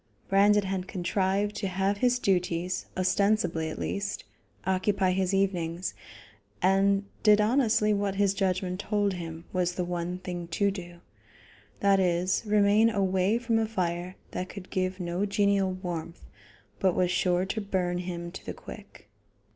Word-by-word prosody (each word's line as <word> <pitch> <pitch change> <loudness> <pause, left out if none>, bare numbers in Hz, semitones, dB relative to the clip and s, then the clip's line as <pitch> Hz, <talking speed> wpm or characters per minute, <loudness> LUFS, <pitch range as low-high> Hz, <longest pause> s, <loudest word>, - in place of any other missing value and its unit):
Brandon 205 +1 +5
had 190 -1 -3
contrived 195 +2 0
to 200 - -2
have 190 +2 0
his 245 +3 +2
duties, 180 -4 0
ostensibly 185 -3 +1
at - - -6
least, 200 0 -3 0.4
occupy 190 0 +1
his 185 0 0
evenings, 185 -3 -1 0.7
and 195 +2 +3 0.2
did 210 -1 +6
honestly 215 -2 +3
what 200 -1 -1
his 200 -1 +2
judgment 185 -1 -1
told 205 -1 0
him 165 -2 -7
was 180 -1 +1
the 180 - -1
one 175 0 -3
thing 180 -2 -6
to 200 +4 +1
do; 175 -3 -9 0.8
that 200 -1 +4
is, 180 0 +1
remain 210 +2 +4
away 195 0 +1
from 230 -2 +1
a 220 - 0
fire 180 -3 -2 0.2
that 185 +1 -4
could 195 -2 -10
give 185 0 -1
no 175 +2 -2
genial 200 -1 +2
warmth, 175 -2 -6 0.5
but 190 -2 +2
was 180 -1 +2
sure 180 0 +1
to 215 +3 -3
burn 180 -3 -1
him 175 -1 -5
to 190 - -9
the - - -6
quick. 205 - -12
190 Hz, 150 wpm, -28 LUFS, 180-200 Hz, 0.8 s, did